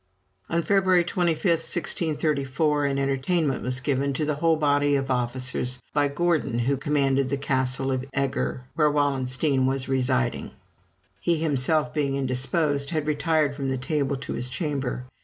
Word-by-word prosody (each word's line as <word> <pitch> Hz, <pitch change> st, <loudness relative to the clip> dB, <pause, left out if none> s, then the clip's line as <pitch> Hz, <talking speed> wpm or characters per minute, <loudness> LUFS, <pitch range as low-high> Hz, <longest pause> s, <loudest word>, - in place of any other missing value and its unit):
On 170 Hz, +1 st, 0 dB
February 190 Hz, -2 st, +3 dB
25, 170 Hz, -2 st, -1 dB
1634, 150 Hz, -4 st, 0 dB
an 140 Hz, -1 st, 0 dB
entertainment 140 Hz, +2 st, 0 dB
was 125 Hz, 0 st, -1 dB
given 140 Hz, +1 st, 0 dB
to 150 Hz, +3 st, -1 dB
the 150 Hz, -, 0 dB
whole 165 Hz, +3 st, +2 dB
body 145 Hz, -1 st, +2 dB
of 135 Hz, -1 st, -1 dB
officers 125 Hz, 0 st, 0 dB
by 145 Hz, -1 st, +2 dB
Gordon, 155 Hz, -4 st, 0 dB
who 125 Hz, +4 st, +1 dB
commanded 135 Hz, -1 st, +1 dB
the 140 Hz, -, -1 dB
castle 135 Hz, -1 st, 0 dB
of 130 Hz, 0 st, -2 dB
Eger, 135 Hz, -2 st, -2 dB
where 150 Hz, -1 st, +3 dB
Wallenstein 135 Hz, -1 st, +1 dB
was 135 Hz, 0 st, -1 dB
residing. 130 Hz, -2 st, 0 dB, 0.7 s
He 170 Hz, -1 st, +1 dB
himself 150 Hz, -3 st, +2 dB
being 140 Hz, -2 st, 0 dB
indisposed, 140 Hz, +2 st, 0 dB
had 155 Hz, -3 st, -1 dB
retired 150 Hz, 0 st, +1 dB
from 140 Hz, -1 st, -3 dB
the 130 Hz, -, -1 dB
table 140 Hz, +1 st, -1 dB
to 135 Hz, +1 st, -6 dB
his 125 Hz, +1 st, -4 dB
chamber. 135 Hz, -3 st, -3 dB
140 Hz, 150 wpm, -25 LUFS, 130-155 Hz, 0.7 s, February